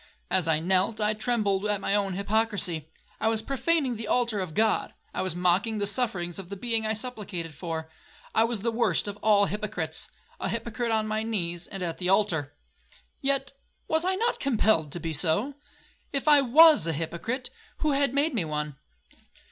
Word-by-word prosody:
As 185 -3 +3
I 160 -1 +3
knelt, 190 +6 +1
I 210 0 +2
trembled 210 -3 0
at 205 -1 0
my 200 - -1
own 200 -2 0
hypocrisy. 200 -5 0 0.3
I - - 0
was 225 -1 +1
profaning 275 0 0
the 220 -1 -6
altar 235 -3 +1
of 185 -5 -5
God,—I 220 0 -1
was 185 -3 -2
mocking 180 +5 +2
the 205 - 0
sufferings 195 -5 -2
of 185 -2 -8
the 200 - -5
being 225 +1 0
I 220 - +1
supplicated 205 -8 -5
for,—I 160 +6 -4
was 230 -3 -1
the 230 +2 0
worst 230 -2 +1
of 205 0 -5
all 205 -1 +4
hypocrites, 195 -6 -3 0.3
a - - -2
hypocrite 230 +2 -3
on 220 -1 +1
my 215 0 -1
knees, 175 -6 -2
and 195 -2 -6
at 170 -2 -4
the 180 -1 -1
altar. 160 -8 +1 0.7
Yet, 275 0 0 0.3
was 320 +1 +1
I 375 +1 +1
not 465 +5 0
compelled 215 - +2
to 175 - -1
be 165 -1 -4
so? 175 - +2 0.6
If 275 +1 -2
I 295 -1 +7
was 295 - +6
a 165 - 0
hypocrite, 170 - -3 0.3
who 305 - 0
had 280 -2 +2
made 285 +3 +2
me 220 -7 0
one? 150 -2 -4
210 Hz, 180 wpm, -27 LUFS, 175-235 Hz, 0.7 s, I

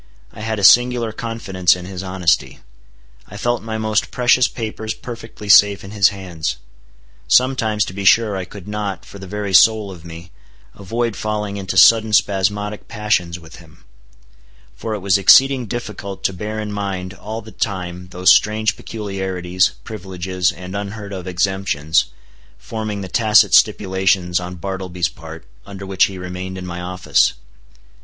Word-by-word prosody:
I - - -11
had 110 0 -2
a 100 - -4
singular 120 +1 +5
confidence 105 -6 0
in 90 0 -9
his 95 -1 -6
honesty. 95 -3 0 0.7
I 105 - -10
felt 120 +2 -1
my 110 0 -4
most 110 -1 0
precious 125 0 +3
papers 110 -1 -5
perfectly 115 -3 -9
safe 100 +1 +6
in 95 - -10
his 100 -3 +4
hands. 90 -5 -5 0.7
Sometimes 115 -3 +2
to - - -8
be 100 +1 -5
sure 105 +1 +4
I 95 -1 -4
could 100 +1 -12
not, 105 -2 -4
for 100 - -12
the 95 - -9
very 100 0 -4
soul 110 +1 +5
of 85 -4 -12
me, 85 0 -11 0.4
avoid 115 +3 -3
falling 105 -1 -3
into 95 -2 -4
sudden 110 -1 +6
spasmodic 105 +1 0
passions 105 -6 -1
with 80 -2 -14
him. 85 +1 -18 0.9
For 110 -1 -4
it 105 - -6
was 100 +1 +2
exceeding 130 +5 +5
difficult 105 -3 -6
to 95 - 0
bear 105 +4 -5
in 105 -1 -4
mind 95 -2 -4
all 110 +3 -7
the 110 - -12
time 90 -4 -4
those 90 0 +3
strange 110 +1 +1
peculiarities, 95 -4 -2
privileges, 95 -3 -3
and 90 +2 -9
unheard 100 0 -6
of 95 -1 -7
exemptions, 90 -4 0 0.5
forming 110 -2 -5
the 95 - -6
tacit 110 +3 +4
stipulations 95 -2 +2
on 90 0 -7
Bartleby's 90 -2 -3
part 80 0 -11 0.2
under 100 -1 -8
which 95 -1 +3
he 95 - -7
remained 90 +1 -6
in 90 - -7
my 90 0 -6
office. 90 -6 +1
100 Hz, 160 wpm, -19 LUFS, 90-110 Hz, 0.9 s, safe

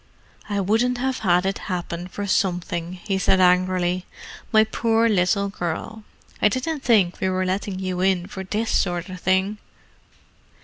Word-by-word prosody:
"I 205 -1 0
wouldn't 225 +6 +1
have 260 +1 -1
had 180 -3 +2
it 195 0 -1
happen 175 -1 -3
for 205 +2 -5
something," 175 -3 -1
he 190 +1 -3
said 190 0 +3
angrily. 180 0 +2 0.4
"My 220 -1 +6
poor 225 +1 +1
little 200 0 +2
girl, 195 +4 -5 0.4
I 210 - +5
didn't 285 +7 -2
think 210 -9 +2
we 190 - 0
were 185 0 0
letting 190 +1 -2
you 185 -1 -3
in 185 -2 +2
for 190 +1 -7
this 215 +4 -2
sort 175 0 0
of 185 -1 -7
thing." 190 +3 +1
190 Hz, 160 wpm, -23 LUFS, 180-215 Hz, 0.4 s, My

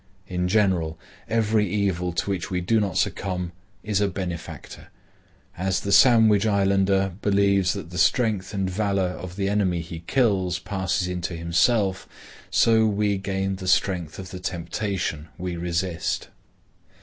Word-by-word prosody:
In 90 -1 -1
general, 90 -6 +1 0.3
every 110 -2 +2
evil 95 -3 0
to 85 +4 -2
which 95 -3 -3
we 90 - -1
do 110 +6 +2
not 100 -5 -1
succumb 90 -2 -1 0.3
is 105 -2 0
a 100 - +3
benefactor. 90 -3 -6 0.7
As 95 +1 -1
the 100 - -3
Sandwich 110 -3 +6
Islander 95 -1 +2
believes 100 -2 +3
that 85 - -7
the 90 - -4
strength 105 -3 +2
and 95 -3 -1
valor 95 -1 0
of 90 0 -7
the 100 -1 -1
enemy 95 -4 +1
he 80 0 -7
kills 95 -9 +2
passes 95 +1 -2
into 90 -1 -3
himself, 95 +4 +1 0.4
so 110 -1 +4
we 105 -1 0
gain 95 0 -2
the 95 -1 -7
strength 90 -4 +1
of 95 -1 -8
the 95 - -6
temptation 85 -2 -3
we 90 -1 -4
resist. 85 0 -2
95 Hz, 145 wpm, -24 LUFS, 90-100 Hz, 0.7 s, Sandwich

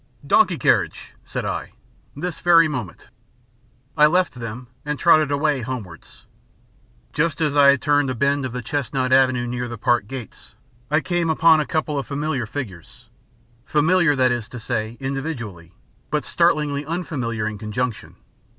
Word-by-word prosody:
"Donkey - - +3
carriage," - - 0
said - - -4
I. - - -4 0.4
"This 170 +3 -4
very 165 -2 +5
moment 125 - -5
minute." - - -22 0.8
I 150 -1 +6
left 180 +3 +1
them 120 0 -7 0.2
and 150 0 -3
trotted 155 -3 +4
away 145 -1 +1
homewards. 115 -9 -8 0.9
Just 155 -1 0
as 150 -3 0
I 145 -1 +6
had 140 -2 +3
turned 145 -2 +2
a 130 - -2
bend 140 +3 +1
of 130 - -3
the 125 0 -5
chestnut 130 0 -1
avenue 130 -2 +3
near 125 0 -3
the 120 -1 -7
Park 105 -1 +1
gates, 130 -2 -9 0.3
I 155 +2 +2
came 175 -1 -1
upon 160 0 +5
a 150 - -1
couple 155 -3 -1
of 135 - -6
familiar 140 -4 -2
figures 125 - -8 0.5
familiar, 160 +2 +3
that 130 -2 +3
is 120 -2 -3
to 125 - -8
say, 110 0 -3
individually, 130 - -5 0.3
but - - -1
startlingly 145 -1 +1
unfamiliar 140 -10 -3
in 110 -2 -4
conjunction. 110 +2 -4
135 Hz, 160 wpm, -22 LUFS, 120-150 Hz, 0.9 s, I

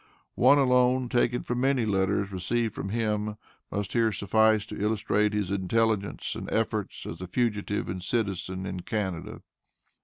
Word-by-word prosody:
One 145 - +5
alone, 125 -1 +3
taken 125 0 +1
from 120 0 -2
many 135 -3 +2
letters 100 0 +1
received 110 +4 -1
from 95 - -5
him, 105 -1 -1 0.3
must 100 -1 -3
here 115 -2 +3
suffice 110 +2 +3
to 105 -2 -7
illustrate 105 0 +1
his 105 -3 -1
intelligence 100 +1 0
and - - -6
efforts 110 -3 -1
as - - -7
a 90 - -5
fugitive 105 0 -1
and 90 0 -4
citizen 95 -3 -2
in 95 -1 -4
Canada. 95 -3 -4
105 Hz, 150 wpm, -27 LUFS, 95-115 Hz, 0.3 s, One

